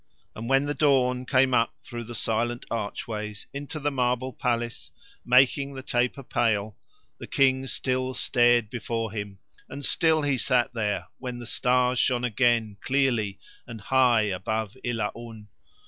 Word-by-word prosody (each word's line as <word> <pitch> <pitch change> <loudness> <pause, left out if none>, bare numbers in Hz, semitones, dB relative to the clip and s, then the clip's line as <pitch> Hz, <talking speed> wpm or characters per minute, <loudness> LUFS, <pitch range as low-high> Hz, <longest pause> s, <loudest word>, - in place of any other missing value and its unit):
And 115 +2 -6
when 135 +1 +3
the 145 - -1
dawn 130 -4 +2
came 130 0 +3
up 115 -1 +2
through 120 -1 -7
silent 120 +2 -1
archways 105 -1 -4
into 145 +2 -6
the 145 0 -1
marble 125 -1 0
palace, 120 -1 -2 0.3
making 135 +2 +3
the 130 - -7
taper 125 +1 -1
pale, 110 -4 0 0.4
the - - -8
King 135 -1 +2
still 130 0 -2
stared 120 -3 +3
before 115 -2 -3
him, 100 -2 -6 0.3
and 140 0 -5
still 160 -2 +3
he 140 -3 +1
sat 125 -2 +2
there 105 -3 -1
when 125 -2 -5
the 120 - -8
stars 125 +1 +2
shone 125 -1 +2
again 120 -3 +1
clearly 120 -7 +1 0.3
and 115 -2 -8
high 125 0 +3
above 105 +2 -2
Ilaun. 115 -2 -4
120 Hz, 145 wpm, -26 LUFS, 110-130 Hz, 0.4 s, when